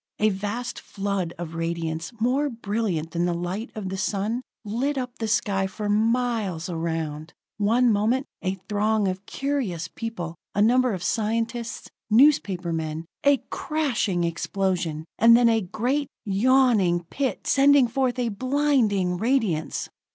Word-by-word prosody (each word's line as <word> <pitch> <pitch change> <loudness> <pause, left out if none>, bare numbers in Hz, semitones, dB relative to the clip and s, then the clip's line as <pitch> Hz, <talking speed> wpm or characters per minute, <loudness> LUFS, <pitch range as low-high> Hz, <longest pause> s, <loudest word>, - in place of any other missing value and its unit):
A 215 - +3
vast 210 +5 -3
flood 195 -4 -3
of 170 -1 -6
radiance, 165 -1 -3
more 265 +6 +1
brilliant 205 - -2
than 170 +1 0
the 175 -1 0
light 180 +7 -3
of 205 -4 -4
the 190 - -4
sun, 210 +5 -1 0.2
lit 255 +7 -1
up 250 -1 -4
the 225 - -1
sky 200 -2 +1
for 205 +2 -4
miles 220 -5 +1
around. 160 -2 -3 0.2
One 230 +4 +3
moment, 230 +6 +1 0.2
a 190 0 -1
throng 210 0 +1
of 185 +1 -4
curious 250 - -2
people, 175 -7 -6 0.2
a - - 0
number 250 +1 +4
of 180 - -6
scientists, 230 +5 -2 0.2
newspaper 210 - +4
men 160 0 -3 0.2
a 280 -3 +4
crashing 245 - 0
explosion 170 -2 -1
and 230 +1 +8
then 240 -1 +5
a 225 -1 +3
great, 250 +10 -1 0.2
yawning 210 -4 +3
pit 275 -2 -2
sending 280 -2 +5
forth 255 +1 0
a 245 -2 0
blinding 230 -7 +1
radiance! 215 - 0
210 Hz, 140 wpm, -25 LUFS, 180-245 Hz, 0.2 s, and